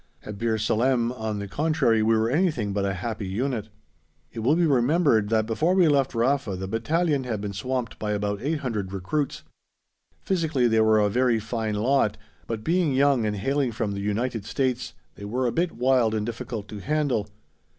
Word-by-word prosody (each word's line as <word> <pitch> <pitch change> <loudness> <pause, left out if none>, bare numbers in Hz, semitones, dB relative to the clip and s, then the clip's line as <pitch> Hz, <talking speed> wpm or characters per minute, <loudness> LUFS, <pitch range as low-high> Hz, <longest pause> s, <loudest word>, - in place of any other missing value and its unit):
At 105 -2 -8
Bir 115 -1 0
Salem, 115 +3 +1
on 110 -4 -4
the 100 0 -5
contrary, 140 -3 +1
we 110 +1 +3
were 110 +1 +1
anything 145 - +1
but 100 -1 0
a 100 -1 -1
happy 105 +1 -4
unit. 110 +2 -2 0.6
It - - -6
will 130 +8 +3
be 175 0 +3
remembered 135 -5 +3
that 110 -1 +2
before 155 +12 +1
we 180 -3 +5
left 140 -4 +2
Rafa 120 -3 +1
the 95 +1 -5
battalion 145 - 0
had 115 -4 -3
been 100 0 -4
swamped 125 +3 -3
by 105 -1 -1
about 105 0 -2
800 125 -9 -2
recruits. 115 +10 -2 0.8
Physically 160 -9 +1
they 110 -1 +3
were 110 0 +4
a 105 -1 +3
very 120 +2 +2
fine 110 -1 -3
lot, 110 -1 +1 0.3
but, 110 -2 -4
being 165 -3 +1
young 135 -4 +3
and 105 - -1
hailing 135 +5 0
from 110 -2 -2
the 100 0 -4
United 110 +2 -2
States, 125 0 -2 0.2
they 100 - -10
were 125 +5 -1
a 120 - +1
bit 170 +5 0
wild 125 -2 +2
and 105 -1 -1
difficult 115 -2 -5
to 105 - -7
handle. 135 -5 0
115 Hz, 190 wpm, -25 LUFS, 105-135 Hz, 0.8 s, we